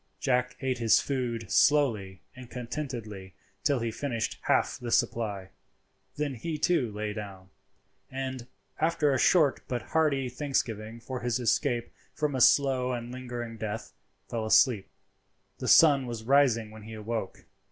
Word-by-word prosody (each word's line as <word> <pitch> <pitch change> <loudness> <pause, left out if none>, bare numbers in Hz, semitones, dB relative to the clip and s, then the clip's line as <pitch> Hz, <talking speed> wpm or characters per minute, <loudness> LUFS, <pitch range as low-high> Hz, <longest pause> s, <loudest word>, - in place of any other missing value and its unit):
Jack 125 -2 0
ate 130 -2 -1
his 115 -2 +5
food 120 -5 -3
slowly 110 -11 +2
and 125 -1 -11
contentedly 115 - -6 0.3
till 140 - +2
he 115 -1 -2
finished 115 -2 -3
half - - +1
the 120 - -5
supply, 110 -6 0 0.7
then 145 -2 -2
he 155 +6 -4
too 150 -9 +1
lay 105 0 -4
down, 100 -3 -8 0.6
and, 130 -2 -5 0.3
after 155 -3 +2
a 130 - +1
short 155 -4 +4
but 120 -3 -3
hearty 150 -5 +2
thanksgiving 115 -4 -3
for 130 +2 -6
his 120 -1 -1
escape 120 0 0 0.2
from 150 -2 -1
a 130 - -1
slow 130 -1 +4
and 120 0 -5
lingering 120 -2 -6
death, 110 0 -5 0.3
fell 115 -2 -3
asleep. 110 -3 +4 0.7
The - - -4
sun 140 -5 +6
was 115 -2 -5
rising 120 -4 +3
when 110 0 -11
he 110 +1 -9
awoke. 110 -2 -5
120 Hz, 145 wpm, -28 LUFS, 110-135 Hz, 0.7 s, sun